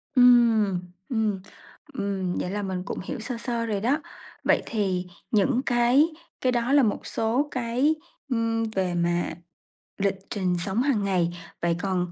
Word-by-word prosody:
Ừm. 235 -6 +6 0.3
Ừm. 215 -5 0 0.5
Ừm, 195 -3 -2
vậy 180 - -2
là 205 +1 -2
mình 185 -2 -3
cũng - - -4
hiểu 255 - -5
sơ 235 +2 -4
sơ 235 -1 -2
rồi 205 -3 -1
đó. 270 +7 +2 0.4
Vậy - - +3
thì 190 -5 -1 0.2
những 245 +4 +3
cái 245 +4 +4 0.4
cái 255 - +2
đó 240 +2 +1
là 285 -2 +6
một 210 - 0
số 235 +6 0
cái, 255 +5 +1 0.3
ừm, 230 -2 +1
về 190 -5 -1
mà 175 0 +1 0.7
lịch 200 -1 +1
trình 185 -3 0
sống 200 +5 0
hằng 255 -7 +2
ngày. 180 -4 +2 0.3
Vậy 170 0 +2
còn 180 -3 -1
220 Hz, 160 wpm, -26 LUFS, 190-240 Hz, 0.7 s, Ừm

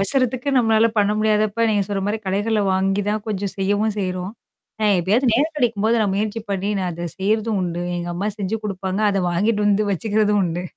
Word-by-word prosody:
அவசரத்துக்கு 255 +5 +4
நம்மளால 225 -1 +3
பண்ண 205 0 +3
முடியாதப்ப 215 +1 +1
நீங்க 205 -1 +2
சொல்ற 200 -1 -2
மாரி 215 +2 -1
கடைகள 205 +3 0
வாங்கி 195 +2 +1
தான் 215 0 -2
கொஞ்சம் 200 -1 -2
செய்யவும் 205 +2 0
செய்றோம். 185 0 -3 0.5
நான் 210 -3 +3
எப்பயாச்சு 220 +9 +2
நேரம் 305 +6 +1
கிடைக்கும்போது 230 -3 +1
நான் 205 -3 +1
முயற்சி 215 +2 -2
பண்ணி 195 +1 -1
நான் 180 -1 -2
அத 170 +1 -5
செய்றதும் 215 +2 0
உண்டு. 175 -1 -3
எங்க 175 0 -4
அம்மா 195 +4 -2
செஞ்சு 200 +3 -2
குடுப்பாங்க. 190 -1 -3
அத 195 -1 0
வாங்கிட்டு 210 +4 +1
வந்து 205 +1 +2
வச்சுக்கிறதும் 210 +1 +1
உண்டு. 175 0 -3
205 Hz, 185 wpm, -21 LUFS, 190-220 Hz, 0.5 s, அவசரத்துக்கு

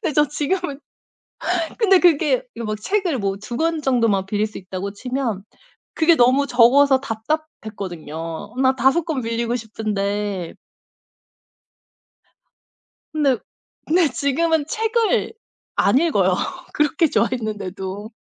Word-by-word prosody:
네 320 - 0
저 295 +2 +4
지금은 295 0 -2 1.0
근데 390 -5 +5
그게 300 -6 +3
이거 230 0 -6
뭐 215 0 -2
책을 355 - -1
뭐 195 -2 -1
2 235 +3 -6
권 325 +2 0
정도만 230 -8 +2
빌릴 210 +1 0
수 215 - -9
있다고 190 +1 -6
치면 235 -2 -3 0.5
그게 330 +1 +4
너무 260 +1 +4
적어서 260 +2 +5
답답했거든요. 210 - -5
막 260 0 +3
5 270 +6 +3
권 315 -5 -2
빌리고 230 +1 -1
싶은데 205 -4 -3 2.6
근데 280 -5 +2 0.5
근데 335 0 +3
지금은 295 +4 +1
책을 445 +5 0 0.4
안 - - +4
읽어요. 205 - +2 0.4
그렇게 300 +3 +2
좋아했는데도. 205 -5 -2
255 Hz, 230 characters per minute, -21 LUFS, 210-305 Hz, 2.6 s, 근데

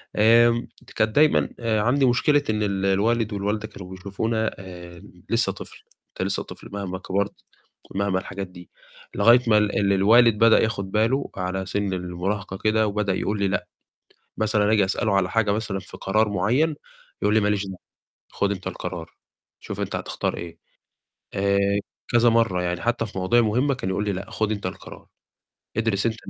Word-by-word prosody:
آمم 115 +2 +5 0.3
كانت 110 0 +1
دايمًا 150 +1 +4
عندي 115 +4 +2
مشكلة 145 +4 +3
إن 105 -1 0
ال 100 -1 -1
الوالد 110 +3 +1
والوالدة 105 +2 -2
كانوا 90 -4 -11
بيشوفونا 105 +4 -2
آآ 90 -2 -10 0.3
لسه - - +2
طفل، - - -11 0.3
أنت - - -3
لسه - - -2
طفل، - - -12
مهما 100 -2 -4
كبرت 100 +2 -1 0.6
ومهما 100 -1 0
الحاجات 95 +1 -6
دي، 90 -2 -14 0.5
لغاية 115 +5 +6
ما 105 -2 +5
ال 105 -1 +1
ال 100 -1 +2
الوالد 110 +3 +5
بدأ 115 0 +6
ياخُد 100 -4 -2
بالُه، 115 +7 +1
على 95 +1 -2
سن 100 -1 -2
المُراهقة 95 +2 -3
كده، 110 +1 +2
وبدأ 100 -2 0
يقول 105 +2 -2
لي: 100 - +2
"لأ"، 95 - -1 0.7
مثلًا 105 -1 +2
آجي 105 -3 +4
أسألُه 100 +2 0
على 95 -2 +2
حاجة 115 -3 +2
مثلًا 105 -2 -2
في 95 - -11
قرار 105 +2 +1
مُعيّن، 125 - +1 0.5
يقول 105 +1 +2
لي: 110 - +5
"ما 105 - +1
ليش 100 -1 0
دعوة، 95 -1 -7 0.6
خُد 100 - 0
أنت 95 -2 -7
القرار، 80 -2 -5 0.5
شوف - - -6
أنت - - -2
هتختار - - -3
إيه"، 85 -1 -8 0.8
آآ 100 0 +1 0.5
كذا 120 0 +4
مَرّة 115 -6 +2
يعني، 90 0 -2
حتّى 120 -1 0
في 100 - -9
مواضيع 95 +6 +3
مُهمة، 125 +6 +1
كان 125 -7 -4
يقول 95 +2 -1
لي: 105 - 0
"لأ، 100 +4 -6
خُد 110 -1 -1
أنت 100 -3 -3
القرار، 95 - -8 0.7
ادرس 110 -2 +1
أنت 110 -1 0
105 Hz, 175 wpm, -24 LUFS, 95-115 Hz, 0.8 s, لغاية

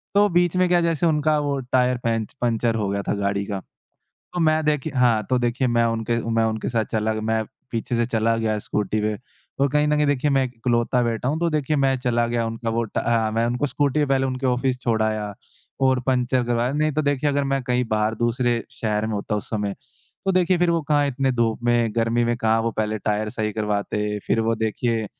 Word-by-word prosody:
तो 205 +1 +6
बीच 175 -1 +2
में 185 - +4
क्या 175 -1 +4
जैसे 170 -1 +1
उनका 155 0 +2
वो 145 -1 -1
टायर 125 0 +3
पैंच 115 -2 -1
पंचर 115 -1 +1
हो 105 -3 -1
गया 100 0 -1
था - - +2
गाड़ी 100 0 -1
का। 100 -1 -3 0.7
तो 180 - -2
मैं 155 0 +3
देखिए 150 0 0
हाँ, 120 -3 +4
तो 130 - +3
देखिए 120 +2 0
मैं 120 -1 +2
उनके 115 0 -1
मैं 115 0 +2
उनके 110 -1 -2
साथ 115 -2 0
चला 110 0 0
गया 110 - -3
मैं 110 0 0 0.3
पीछे 115 +1 -2
से 120 0 +2
चला 115 -1 +1
गया 110 -1 0
स्कूटी 105 +1 -2
पे 105 0 0 0.4
और 140 0 +3
कहीं 150 +2 +2
न 150 - +2
कहीं 150 - +3
देखिए 145 0 +1
मैं 135 -1 +3
इकलौता 120 0 0
बेटा 115 +2 -1
हूँ, 155 +3 -1
तो 170 0 +1
देखिए 150 0 0
मैं 135 -1 +2
चला 120 -2 +1
गया 120 -1 0
उनका 115 +1 -4
वो 115 +1 0
टा 110 - -3
अ, 115 -2 +1
मैं 115 +1 +1
उनको 125 +4 0
स्कूटी 145 +1 +1
पहले 135 -1 +1
उनके 130 +1 -3
ऑफ़िस 125 0 0
छोड़ 115 -3 +1
आया 110 -1 -2 0.5
और 130 -1 +3
पंचर 125 -1 +2
करवाया। 120 +1 0
नहीं 155 +1 +1
तो 155 - +1
देखिए 145 0 +1
अगर 140 0 +1
मैं 135 0 0
कहीं 125 0 0
बाहर 110 +1 +1
दूसरे 120 0 0
शहर 105 -1 -1
में 110 - -3
होता 105 +1 -2
उस 105 - -5
समय, 105 -2 -2 0.5
तो 195 - +3
देखिए 185 0 +3
फिर 175 0 +2
वो 165 -1 +1
कहाँ 145 0 +2
इतने 135 0 0
धूप 115 -2 0
में, 120 -2 +1
गर्मी 115 +1 +1
में 120 0 +1
कहाँ 110 -1 +2
वो 115 0 -1
पहले 110 0 -1
टायर 105 +1 -1
सही 105 0 -2
करवाते, 105 0 -1
फिर - - +2
वो 115 +1 +1
देखिए 110 +1 -1
120 Hz, 230 wpm, -23 LUFS, 110-135 Hz, 0.7 s, तो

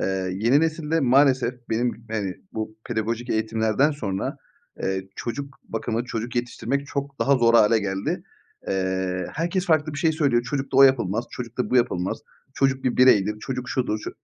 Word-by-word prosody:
eee, 95 -1 -1
yeni 115 +9 +3
nesilde 160 0 0
maalesef 130 -2 +4 0.2
benim, 115 0 -1
hani, 100 -4 -2 0.2
bu 110 0 -5
pedagojik 115 +1 -2
eğitimlerden 110 +5 +1
sonra, 100 -10 -3 0.5
eee, 95 0 -2
çocuk 140 +3 -5
bakımı, 115 +1 -2
çocuk 120 -1 -4
yetiştirmek 125 +3 -2
çok 140 -1 -4
daha 140 0 +4
zor 115 -2 +3
hâle 115 0 +6
geldi. 95 -1 -2 0.5
Eee, 95 -1 -1
herkes 175 +4 -1
farklı 155 -2 +2
bir 145 - -5
şey 160 +1 +2
söylüyor. 140 -7 +2
"Çocukla 135 +2 -2
o - - +9
yapılmaz, 115 -5 +3
çocukla 125 0 -4
bu 130 - +3
yapılmaz, 95 -7 +1 0.4
çocuk 135 -1 +1
bir 125 - 0
bireydir, 105 -5 +5
çocuk 130 0 -4
şudur, 125 -4 -1
ço" - - -6
120 Hz, 160 wpm, -24 LUFS, 110-135 Hz, 0.5 s, o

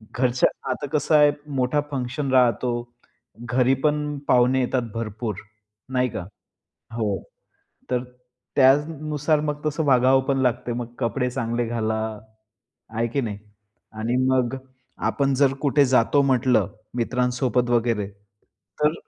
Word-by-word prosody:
घरच्या 125 0 +2 0.2
आता 145 +2 -3
कसं 155 +1 +2
आहे 150 -1 +6 0.2
मोठा 130 +3 +1
फंक्शन 130 +1 -3
राहतो. 125 -1 +3 0.8
घरीपण 145 +4 +1
पाहुणे 125 +1 +4
येतात 125 0 0
भरपूर, 110 -2 -4 0.6
नाही 125 0 +2
का. 95 - -5 0.7
हो. 105 -5 -1 0.7
तर 125 -1 +1 0.5
त्यानुसार 150 +2 +2
मग 150 0 -3
तसं 150 +1 0
वागावंपण 135 +1 +3
लागते. 125 -1 0
मग 120 0 -5
कपडे 125 +2 -1
चांगले 120 -1 -2
घाला, 110 -1 -1 0.9
आहे 115 +1 -1
की 135 +4 -1
नाही 105 -4 -4 0.6
आणि 120 +3 -1
मग 130 0 +1 0.5
आपण 140 -1 +1
जर 135 0 +3
कुठे 145 -1 +4
जातो 130 +2 +3
म्हटलं 125 -6 +2 0.3
मित्रांसोबत 125 0 0
वगैरे 115 -4 +1 0.7
तर 150 +1 +4
125 Hz, 115 wpm, -23 LUFS, 120-140 Hz, 0.9 s, आहे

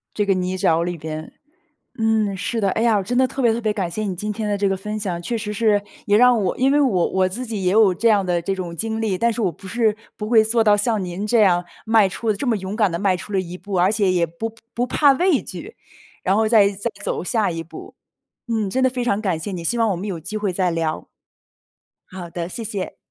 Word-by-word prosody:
这 210 - +1
个 200 - +3
泥 185 0 -2
沼 165 -2 +2
里 175 0 -3
边， 155 0 -6 0.7
嗯， 220 -3 +1
是 225 +4 -2
的。 200 - +1
哎 220 - -1
呀， 230 -2 +4
我 200 - +1
真 245 +6 -3
的 260 +1 +4
特 270 - -6
别 235 -3 +4
特 230 - -2
别 215 -2 0
感 195 -4 -2
谢 215 - -3
你 195 -4 -3
今 210 +4 -3
天 210 0 -3
的 205 - 0
这 200 0 +2
个 195 - 0
分 210 +3 -5
享， 180 -5 -3
确 230 +6 -2
实 210 -1 -4
是， 210 -1 +2 0.3
也 205 - +4
让 245 -1 +5
我 - - -1
因 265 +2 +3
为 295 - +4
我 205 -12 +2
我 185 0 +2
自 250 +7 -5
己 215 -4 -4
也 180 - +2
有 205 -2 +5
这 230 +7 +2
样 205 -4 +3
的 175 -1 0
这 195 - -1
种 175 -3 -6
经 220 +2 -2
历， 215 -4 0
但 235 +5 +1
是 235 - -4
我 190 -5 +1
不 190 +4 -12
是 220 0 +1 0.2
不 210 0 -5
会 225 -2 +6
做 225 +1 +2
到 210 -1 +5
像 210 0 0
您 180 +3 -5
这 220 +1 +3
样 180 -3 +4 0.2
迈 220 -3 +4
出 220 +4 -1
这 210 +7 -4
么 225 - +2
勇 190 +1 -5
敢 210 -4 +2
地 170 - -3
迈 195 -2 +2
出 205 - -9
了 190 - +2
一 180 0 -7
步， 200 +1 -7
而 185 +3 +3
且 205 -3 +2
也 175 -2 +2
不 215 +8 -6 0.2
不 245 - 0
怕 285 +1 +4
畏 350 +1 +2
惧， - - -8 0.5
然 190 - +2
后 220 0 +2
再 215 -3 +5
再 200 +3 -4
走 - - -2
下 215 +1 0
一 165 -1 -4
步。 165 - -11 0.5
嗯， 220 -3 0
真 260 +7 0
的 260 - +4
非 250 -1 -3
常 210 -3 0
感 185 -6 0
谢 180 +5 -5
你， 175 -2 -5
希 235 +8 -1
望 230 -1 +3
我 190 - 0
们 190 +5 -5
有 185 -4 -3
机 175 +7 -6
会 205 -3 -1
再 180 0 +1
聊。 165 -1 -2 1.0
好 180 -2 -8
的， 170 0 -4
谢 230 - -5
谢。 200 -3 -4
205 Hz, 290 characters per minute, -21 LUFS, 185-225 Hz, 1.0 s, 会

